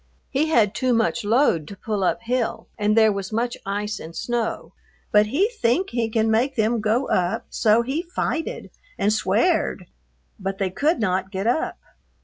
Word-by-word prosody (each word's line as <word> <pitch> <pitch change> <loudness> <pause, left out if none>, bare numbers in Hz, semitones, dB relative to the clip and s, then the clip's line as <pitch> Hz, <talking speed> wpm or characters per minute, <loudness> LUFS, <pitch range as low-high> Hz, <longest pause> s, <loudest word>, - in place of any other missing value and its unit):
he 290 +3 +1
had 225 -10 +3
too 255 0 +1
much 230 0 +1
load 205 - +2
to 200 - -9
pull 210 -2 -2
up 230 +5 0
hill 245 0 -1
and 210 0 +1
there 220 -1 +6
was 200 0 -4
much 235 +2 -1
ice 210 +1 -2
and 165 +1 -9
snow 240 -2 -3 0.4
but 210 0 +5
he 320 - +2
think 375 - 0
he 230 -2 0
can 220 0 +1
make 250 +5 +1
them 225 0 +1
go 220 +5 +1
up 180 0 0
so 225 +1 +3
he 270 +7 -2
fighted 335 -2 -3 0.3
and 210 +1 +2
sweared 220 - +1 0.5
but 195 0 -3
they 195 -2 -1
could 305 - +1
not 190 -3 0
get 190 0 -3
up. 245 +7 0
225 Hz, 175 wpm, -23 LUFS, 205-250 Hz, 0.5 s, there